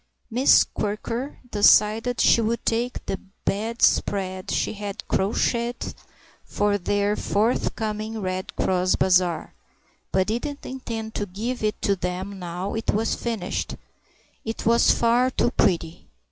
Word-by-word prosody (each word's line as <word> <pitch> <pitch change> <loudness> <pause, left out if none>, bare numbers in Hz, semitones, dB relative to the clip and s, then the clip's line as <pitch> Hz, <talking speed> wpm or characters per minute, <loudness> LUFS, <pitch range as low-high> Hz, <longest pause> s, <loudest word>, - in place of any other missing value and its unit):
Miss 255 +5 +6
Quirker 230 +6 -4
decided 215 +3 +4
she 235 - +5
would 230 +1 -1
take 235 +2 -1
the 195 - -3 0.3
bedspread 200 -3 0
she - - 0
had 205 -1 -6
crocheted 235 +4 0 0.5
for 205 0 0
their 205 +2 +1
forthcoming 215 0 -1
Red 185 -1 -4
Cross 185 0 +1
bazaar 180 -3 +2 0.6
(but 190 0 +2
didn't 260 +7 -3
intend 230 -4 -5
to 205 - -3
give 225 +7 -4
it 215 0 -1
to 200 - +2
them 185 +2 -4
now 180 +2 -4
it 225 - -1
was 220 +2 0
finished; 225 -6 -3 0.7
it 225 0 -5
was 235 +1 +4
far 240 +2 +3
too 240 - +1
pretty. 170 -7 0
210 Hz, 125 wpm, -24 LUFS, 190-235 Hz, 0.7 s, Miss